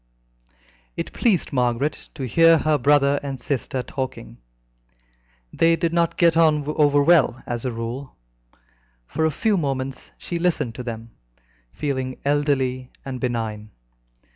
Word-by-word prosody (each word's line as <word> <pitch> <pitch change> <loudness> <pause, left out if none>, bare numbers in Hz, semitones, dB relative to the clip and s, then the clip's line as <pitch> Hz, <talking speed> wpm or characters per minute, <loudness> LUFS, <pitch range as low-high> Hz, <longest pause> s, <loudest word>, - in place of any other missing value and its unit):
It - - -4
pleased 205 -10 +1
Margaret 125 +3 -1
to 135 -4 -4
hear 165 +6 +5
her 155 -1 +1
brother 140 +1 +3
and 135 -2 -5
sister 130 -1 -3
talking. 125 - -6 1.1
They 165 0 +4
did 165 0 -1
not 170 -1 +1
get 170 -2 +4
on 155 -3 +3
overwell 145 -2 +3
as 120 +1 -4
a 125 - -1
rule. 115 +4 -6 0.9
For 160 - -1
a - - +3
few 210 +6 +1
moments 135 -4 -3
she 170 - -4
listened 165 -9 0
to 125 - -7
them, 115 -1 -7 0.6
feeling 130 - -3
elderly 135 -3 0 0.2
and 130 -2 -5
benign. 110 -4 -3
140 Hz, 130 wpm, -23 LUFS, 125-155 Hz, 1.1 s, hear